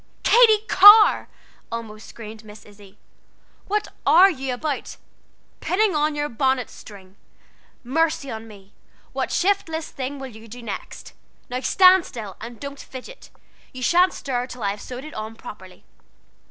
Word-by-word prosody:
"Katy 440 -3 +5
Carr!" 415 +2 +7 0.4
almost 220 -2 -7
screamed 220 -1 -11
Miss 210 0 -14
Izzie, 205 -1 -17 0.7
"what 420 +1 -1
are 375 +4 +6
you 265 -5 -5
about? 280 +3 -4 0.6
Pinning 395 -1 +1
on 300 0 0
your 295 0 -2
bonnet 260 -1 -1
string! 195 -2 -14 0.7
Mercy 300 +1 -1
on 225 0 -7
me, 200 -2 -16 0.4
what - - -3
shiftless 355 -5 -1
thing 275 +1 -5
will 270 -1 -8
you 220 +1 -13
do 240 +2 -11
next? 210 -3 -8 0.4
Now 250 - -2
stand 370 +5 +5
still, 210 -6 -8
and 230 0 -9
don't 280 0 -8
fidget. 265 - -11 0.4
You 255 0 -7
sha'n't 360 +6 +3
stir 250 -3 -3
till 250 -3 -9
I 200 - +1
have 205 +1 -8
sewed 255 +2 -8
it 310 - -10
on 215 +1 -7
properly." 185 -4 -12
255 Hz, 150 wpm, -22 LUFS, 220-325 Hz, 0.7 s, Carr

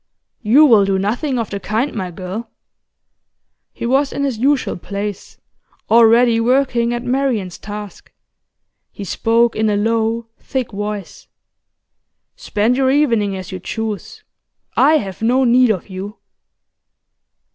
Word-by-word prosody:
'You 255 +7 +5
will 225 -8 +6
do 195 -1 +1
nothing 245 +8 -1
of 230 -3 -3
the 200 - -3
kind, 225 +8 -2
my 190 -4 -4
girl.' 185 +6 -7 1.2
He - - -6
was 270 +3 +1
in 280 - -3
his 265 -6 -2
usual 275 +2 +1
place, 200 +2 -6 0.5
already 230 +1 +5
working 240 -1 +1
at 240 0 -3
Marian's 245 -8 -1
task; 210 -1 -9 0.8
he 205 - -8
spoke 230 +5 +1
in 220 0 +1
a 205 - +1
low, 225 +2 0
thick 260 -3 -4
voice. 205 0 -6 1.1
'Spend 220 +4 0
your 265 -1 +2
evening 230 -9 +1
as 185 -1 -8
you 185 - -5
choose, 220 +1 -5 0.5
I 310 - +5
have 195 -7 -6
no 250 +4 +2
need 250 0 +4
of 195 -5 -1
you. 195 +3 -7
225 Hz, 135 wpm, -18 LUFS, 205-250 Hz, 1.2 s, will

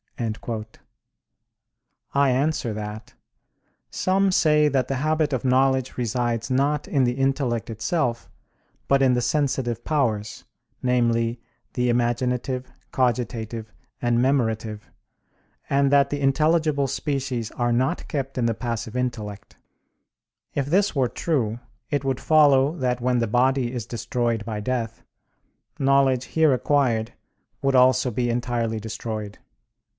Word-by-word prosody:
I 140 -1 +3
answer 130 -2 0
that, 105 0 -7 0.8
Some 195 +1 +1
say 150 -4 +4
that 130 -3 +1
the 135 - -2
habit 155 +1 0
of 130 - -1
knowledge 130 0 +2
resides 120 -1 -1
not 140 +4 +1
in 140 -10 +2
the 120 - +1
intellect 135 -3 -1
itself, 115 +1 -1 0.6
but 140 0 +3
in 130 -2 +4
the 125 - +1
sensitive 125 -4 -1
powers, 110 -9 -1 0.4
namely, 120 -2 +1 0.3
the 125 0 0
imaginative, 125 +2 -1 0.2
cogitative, 115 -3 -2 0.3
and 120 -1 +1
memorative, 110 -5 0 0.8
and 140 0 +2
that 140 -1 +4
the 145 -1 -2
intelligible 150 0 +2
species 135 -4 -2
are 120 -1 0
not 130 +8 0
kept 135 -3 -4
in 120 - +1
the 115 -1 +1
passive 115 -1 -4
intellect. 110 -4 -4 1.0
If 140 -1 -1
this 195 +4 +2
were 130 -3 +2
true, 120 -9 -1 0.3
it 145 -2 -1
would 135 -2 -1
follow 145 -1 +4
that 125 -3 -1
when 125 0 +1
the 115 - 0
body 125 +2 +2
is 120 -3 -4
destroyed 120 -2 -2
by 110 -2 -4
death, 115 -1 -3 0.8
knowledge 135 -2 +3
here 160 -3 +3
acquired 120 -4 +1 0.5
would 135 -1 +2
also 130 0 +4
be 120 +2 -1
entirely 120 -2 -1
destroyed. 110 -1 -6
125 Hz, 125 wpm, -24 LUFS, 115-140 Hz, 1.0 s, say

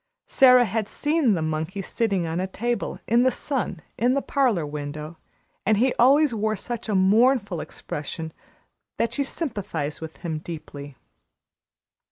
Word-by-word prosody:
Sara 250 -2 +6
had 215 0 -2
seen 295 -7 +1
the 165 - -1
monkey 160 +5 -3
sitting 200 -4 0
on 165 +1 -2
a 185 - -1
table, 240 +5 -2
in 235 +2 +4
the 260 - +5
sun, 250 - -3 0.2
in 245 +3 +3
the 275 - +1
parlor 245 - +1
window, 150 +2 -6 0.4
and 215 0 +3
he 250 +4 +3
always 275 +3 +5
wore 215 0 0
such 235 +2 -5
a 210 - +1
mournful 205 - +3
expression 160 +2 -6 0.6
that 230 - 0
she 285 - 0
sympathized 205 - -3
with 160 0 -8
him 160 -2 -2
deeply. 145 -4 -8
205 Hz, 150 wpm, -24 LUFS, 160-245 Hz, 0.6 s, Sara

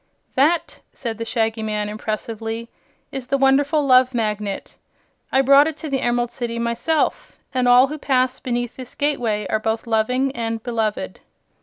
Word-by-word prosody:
"That," 310 +6 +1
said 230 -3 -5
the 230 - -3
Shaggy 225 -1 -1
Man, 210 -1 -2
impressively, 225 +2 -4 0.4
"is 265 -2 -5
the 275 - +1
wonderful 280 +2 +3
Love 255 -1 +5
Magnet. 210 -3 -2 0.6
I 265 - +4
brought 280 +2 +6
it 315 -2 -4
to 310 -2 -6
the 270 -1 0
Emerald 240 0 0
City 235 -2 -4
myself, 235 +7 -1 0.2
and 255 -1 +1
all 245 +1 +7
who 300 +3 -6
pass 260 -2 +1
beneath 245 -1 -3
this 255 -2 -9
gateway 240 -8 0
are 215 - +2
both 220 +1 -2
loving 250 +4 +1
and 225 -1 -3
beloved." 220 - -2
240 Hz, 160 wpm, -21 LUFS, 225-270 Hz, 0.6 s, all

